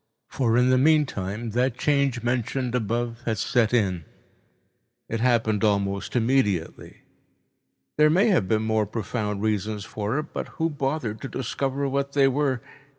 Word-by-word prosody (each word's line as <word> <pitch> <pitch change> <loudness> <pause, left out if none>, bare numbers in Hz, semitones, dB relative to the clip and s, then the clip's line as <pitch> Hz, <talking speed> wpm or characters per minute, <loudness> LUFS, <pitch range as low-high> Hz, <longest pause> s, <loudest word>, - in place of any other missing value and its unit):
For 120 -3 +1
in 125 +1 +4
the 130 - +4
meantime 120 -8 +1
that 125 +2 0
change 140 -5 +1
mentioned 125 +1 -1
above 120 0 -2
had 110 -2 0
set 115 +3 +1
it. 100 -8 +1 1.1
It 115 - -3
happened 115 -4 +2
almost 100 -1 0
immediately. 115 -8 0 1.0
There 150 0 +5
may 190 +8 +4
have 145 - +2
been 110 +1 +1
more 110 -1 +1
profound 105 -2 -3
reasons 105 -1 -1
for 105 +4 -3
it, 155 +1 -5
but - - -4
who 165 0 0
bothered 135 -6 -3
to - - -4
discover 135 +1 -2
what 140 +1 -2
they 140 -1 +4
were? 135 -3 0
120 Hz, 150 wpm, -25 LUFS, 110-135 Hz, 1.1 s, There